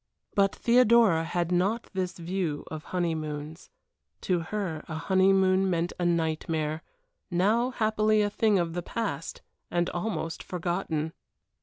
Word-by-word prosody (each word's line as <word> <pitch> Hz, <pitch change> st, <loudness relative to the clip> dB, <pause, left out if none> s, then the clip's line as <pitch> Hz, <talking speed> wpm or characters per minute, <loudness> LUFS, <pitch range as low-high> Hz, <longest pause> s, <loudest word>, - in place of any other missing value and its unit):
But 195 Hz, -1 st, +2 dB
Theodora 235 Hz, -8 st, +5 dB
had 175 Hz, +1 st, -1 dB
not 195 Hz, +6 st, 0 dB
this 185 Hz, -2 st, -2 dB
view 170 Hz, -3 st, -2 dB
of 155 Hz, -1 st, -6 dB
honeymoons. 160 Hz, -3 st, -3 dB, 0.5 s
To 180 Hz, -2 st, +1 dB
her 170 Hz, -2 st, -3 dB
a 160 Hz, -, -5 dB
honeymoon 190 Hz, +2 st, +3 dB
meant 175 Hz, 0 st, 0 dB
a 175 Hz, -, 0 dB
nightmare, 160 Hz, -2 st, 0 dB, 0.5 s
now 210 Hz, +7 st, +2 dB
happily 215 Hz, -3 st, +2 dB
a 205 Hz, -, +1 dB
thing 215 Hz, -1 st, +3 dB
of 170 Hz, -2 st, -1 dB
the 175 Hz, -, -2 dB
past, 165 Hz, -6 st, -4 dB, 0.3 s
and 175 Hz, 0 st, 0 dB
almost 175 Hz, -3 st, -3 dB
forgotten. 170 Hz, -3 st, -2 dB
175 Hz, 130 wpm, -28 LUFS, 165-200 Hz, 0.5 s, Theodora